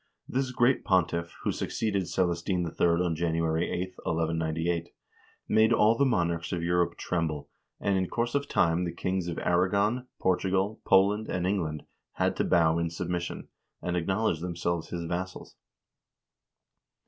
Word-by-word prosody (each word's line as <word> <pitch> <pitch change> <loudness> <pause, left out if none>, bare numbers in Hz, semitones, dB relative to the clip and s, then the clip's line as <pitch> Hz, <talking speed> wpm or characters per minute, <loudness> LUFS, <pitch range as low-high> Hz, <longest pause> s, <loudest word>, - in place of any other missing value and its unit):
This 130 0 -1
great 125 +1 +2
pontiff, 85 -2 +1
who - - +1
succeeded 100 -5 -1
Celestine 90 0 0
III. 85 +1 +1 0.2
on 85 -2 0
January 80 0 0
8, 95 +1 -3
1198, 80 +1 -1 0.6
made 110 +1 +4
all 110 +1 +5
the 140 +3 +3
monarchs 85 -7 0
of 85 -3 -2
Europe 90 0 +1
tremble, 80 -5 -2 0.3
and 100 - +1
in 95 - -1
course 120 0 -1
of 140 0 0
time 85 -5 +2
the 85 - -2
kings 90 +1 -2
of 85 - -4
Aragon, 100 +8 +1
Portugal, 95 +3 0
Poland, 100 +3 +4
and 90 -1 -1
England 85 -6 -1 0.3
had - - 0
to - - +2
bow 80 -1 +3
in 85 0 0
sub 85 +1 -5
mission, 85 -1 -3 0.3
and 90 - -2
acknowledge 95 0 0
themselves 85 -1 -2
his 85 -1 -4
vassals. 90 +2 -5
90 Hz, 150 wpm, -28 LUFS, 85-95 Hz, 0.6 s, all